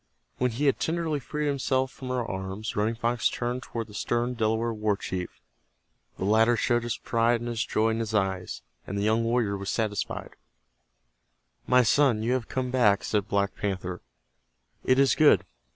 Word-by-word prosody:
When 125 - +2
he 125 +6 -2
had 140 - +3
tenderly 160 -2 -1
freed 150 +3 -4
himself 130 -2 0
from 130 - -9
her 125 -2 -1
arms, 95 +3 -5
Running 110 +3 0
Fox 120 0 +1
turned 125 +1 -3
toward 115 -2 -5
the 105 - -15
stern 120 +3 -1
Delaware 115 0 0
war 105 -2 0
chief. 90 -2 -5 0.8
The - - -3
latter 110 +3 +4
showed 120 0 +2
his 120 -1 -3
pride 115 +1 +1
and 120 - -5
his 120 -1 -1
joy 110 +1 +1
in 110 - -1
his 110 -1 -2
eyes, 95 -3 -1 0.2
and 100 - -4
the 100 - 0
young 110 +2 +2
warrior 115 -3 +1
was 100 0 -5
satisfied. 105 -3 -2 1.3
"My 125 0 +5
son, 120 -2 +3
you 120 +3 +1
have 130 -3 -2
come 130 -1 -2
back," 105 -6 +3
said 105 -2 0
Black 100 -1 0
Panther. 90 -3 -4 0.8
"It 130 - +3
is 135 0 +5
good. 145 - +5
115 Hz, 180 wpm, -27 LUFS, 105-125 Hz, 1.3 s, My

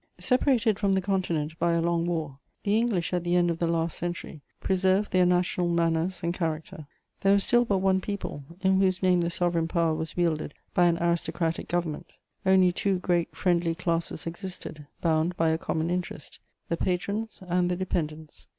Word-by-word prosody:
* - - -31
Separated 245 -5 +3
from 200 -2 +2
the 190 - +3
Continent 170 -5 -1
by 170 0 +2
a 170 - +2
long 170 0 +1
war, 155 -5 -3 0.2
the 205 +1 +2
English 220 -7 0
at 175 -1 0
the 175 0 +1
end 175 -1 +3
of 165 - -4
the 170 - +1
last 165 -1 0
century 175 -3 -5 0.2
preserved 190 +2 +1
their 185 -1 +4
national 180 0 +1
manners 170 +1 0
and 170 0 0
character. 160 -3 -4 0.3
There 195 0 +4
was 200 0 +3
still 240 0 +3
but 200 -4 +1
one 190 0 +2
people, 200 -8 -5 0.2
in 190 0 +3
whose 185 -1 +1
name 180 -1 +4
the 170 - 0
sovereign 170 -1 0
power 165 -2 +1
was 160 +2 -5
wielded 160 -4 0 0.2
by 175 - +4
an 170 -1 +2
aristocratic 170 -1 -1
government; 170 -1 -2 0.4
only 190 -1 +5
two 195 +2 0
great 175 -2 0
friendly 170 -2 +1
classes 170 -1 -2
existed, 170 -4 -6
bound 165 +1 +1
by 165 0 +3
a 160 - 0
common 160 +1 -1
interest: 180 -4 -4 0.3
the 170 - -1
patrons 200 +4 -2
and 180 0 +1
the 180 - 0
dependents. 160 -4 -4
175 Hz, 185 wpm, -27 LUFS, 165-185 Hz, 0.4 s, only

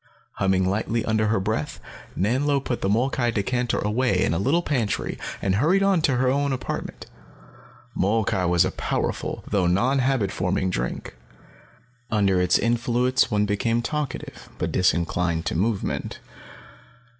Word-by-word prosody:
Humming 95 -1 +2
lightly 110 +3 -1
under 110 -1 +1
her 110 -1 +2
breath, 110 +9 -2 0.4
Nanlo 135 +8 +1
put 125 -3 -3
the 95 - 0
molkai 120 +3 +1
decanter 120 +3 -1
away 105 -2 +1
in - - +1
a 85 - 0
little 155 - +2
pantry 125 -10 -1 0.2
and 95 -1 +1
hurried 175 - +3
on 195 -4 +3
to 135 -4 +2
her 125 +1 +1
own 140 +2 +1
apartment. 130 - -5 0.9
Molkai 100 -2 +1
was 85 -1 +3
a - - -1
powerful, - - -3
though 95 -4 +1
non 120 +10 +2
habit 125 -7 +1
forming 95 +1 -1
drink. - - -4 0.9
Under 100 -4 +2
its 90 0 +3
influence 120 +2 +1
one 105 -2 +1
became 115 +3 0
talkative, 150 -1 -4
but - - -2
disinclined 85 -2 +1
to - - -1
movement. 100 +4 -1
110 Hz, 145 wpm, -24 LUFS, 95-130 Hz, 0.9 s, hurried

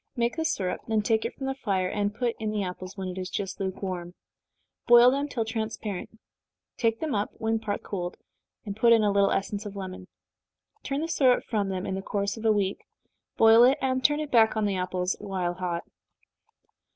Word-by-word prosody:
Make 235 -1 0
the 320 - -2
syrup, 190 - -1
then 220 -2 +1
take 220 +1 +1
it - - -4
from 270 - -6
the 270 - -1
fire, 195 -8 -1
and 205 +2 -1
put 235 +2 -2
in 220 -1 -2
the 210 -1 -1
apples, 185 +1 -7
when 190 -1 -4
it 180 +1 -5
is 185 0 -4
just 190 0 -4
lukewarm. 185 -2 -4 0.7
Boil 240 +1 +8
them 280 +2 -1
till 235 -6 -2
transparent, 220 -2 -4 0.6
take 225 -1 0
them 315 -4 -2
up 205 -1 0
when 225 0 -1
partly 210 -2 -4
cooled, 180 -3 -4 0.6
put 235 +1 +6
in 225 -2 +4
a 205 - +3
little 200 0 +3
essence 200 +1 -2
of 205 -2 -8
lemon. 185 -1 -7 0.7
Turn 275 +1 -2
the 325 - -2
syrup 260 -6 +3
from 205 -4 -1
them 185 -1 -3
in - - -3
the 190 - -3
course 200 0 -2
of 225 0 -8
a 220 - +5
week, 200 -2 0 0.6
boil 225 +1 +7
it, 260 +4 +5
and 260 -1 0
turn 295 +3 +3
it 305 -2 -4
back 220 -2 +4
on 215 - +1
the 200 -1 0
apples 180 0 -1
while 190 -4 -2
hot. 175 -1 -3
210 Hz, 205 wpm, -27 LUFS, 190-235 Hz, 0.7 s, Boil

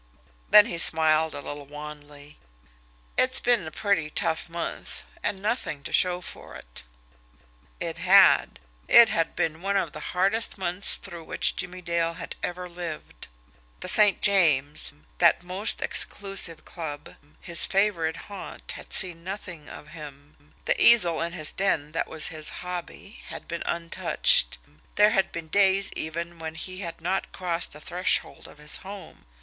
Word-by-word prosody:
Then 210 -1 +8
he 170 -7 -4
smiled 160 -1 +4
a - - -6
little 145 0 -9
wanly. 150 0 -12 0.8
"It's 255 +1 +6
been 235 -9 +1
a - - -5
pretty 175 -5 -1
tough 160 +2 -2
month 170 0 -6 0.2
and 195 - -3
nothing 200 - -3
to - - -8
show 180 -1 +2
for - - -10
it!" - - -10 1.0
It - - -5
had! - - +4 0.3
It 235 -1 +7
had 165 -5 -1
been 160 +1 -2
one 200 +1 -1
of 170 -6 -2
the 155 - -8 0.2
hardest 205 +6 +1
months 185 +1 0
through 170 -4 -10
which - - +1
Jimmie 180 0 -5
Dale 170 0 -1
had - - -8
ever 180 0 -5
lived. 170 - -8 0.5
The - - -4
St. 210 -2 +6
James, 155 -7 +2 0.3
that 170 0 +4
most 185 +4 -2
exclusive 195 -5 0
club, 150 -4 -8 0.3
his 170 -2 +6
favourite 190 -5 0
haunt, 200 -1 -9
had - - -8
seen 175 -3 +1
nothing 185 -5 -8
of 150 - -12
him; 145 -1 -14
the - - 0
easel 180 -9 +6
in 170 +1 -3
his 155 -3 +1
den, 160 -6 -1
that 165 - -2
was 160 -1 +3
his 155 -2 -2 0.2
hobby, 180 +3 -8
had - - -9
been 170 0 -5
untouched; 170 - 0 0.4
there 210 +1 +5
had 195 -4 0
been 165 -1 -7
days 195 +2 +2
even 170 +2 -6
when 160 0 -7
he 185 +3 -7
had 170 -4 -7
not 185 +3 -2
crossed 175 -2 -2
the 150 - -11
threshold 180 +4 -2
of - - -16
his 150 0 +3
home. 195 - -12
170 Hz, 155 wpm, -25 LUFS, 155-195 Hz, 1.0 s, Then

